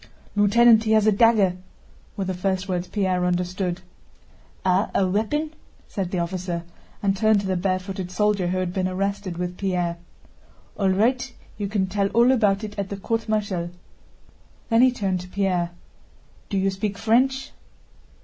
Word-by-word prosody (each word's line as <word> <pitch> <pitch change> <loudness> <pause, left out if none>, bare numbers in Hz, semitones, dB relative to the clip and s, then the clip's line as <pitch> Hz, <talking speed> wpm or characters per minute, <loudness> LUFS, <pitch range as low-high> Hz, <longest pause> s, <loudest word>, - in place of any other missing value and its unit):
"Lieutenant, 220 +2 +5
he 220 - +3
has 215 -1 +4
a 215 - +5
dagger," 205 -4 +4 0.6
were 195 - -1
the 185 - -2
first 190 +1 -1
words 180 -1 -2
Pierre 185 -3 0
understood. 180 0 -1 0.8
"Ah, 185 +2 +2
a 190 - +3
weapon?" 225 +11 -1 0.4
said 195 -4 -3
the 185 - -3
officer 175 0 -3 0.4
and 195 -1 +2
turned 215 +1 +3
to - - -6
the 190 -1 0
barefooted 185 0 -2
soldier 210 -1 +1
who 185 +1 -1
had 185 -1 -2
been 185 -1 0
arrested 195 -1 -2
with 180 0 -4
Pierre. 180 -3 -1 0.8
"All 195 -2 +1
right, 245 +7 +1 0.3
you 205 - -1
can 200 -1 0
tell 195 +1 0
all 240 +2 +6
about 210 -5 +2
it 210 -1 -6
at 200 -1 -3
the 200 - -4
court 225 +3 -2
martial." 200 -5 -1 1.0
Then 230 0 +4
he 255 - +7
turned 195 -6 -1
to 180 - -9
Pierre. 185 -3 0 0.8
"Do 200 - -1
you 195 0 +1
speak 200 +1 -3
French?" 260 +5 +1
195 Hz, 165 wpm, -24 LUFS, 185-215 Hz, 1.0 s, he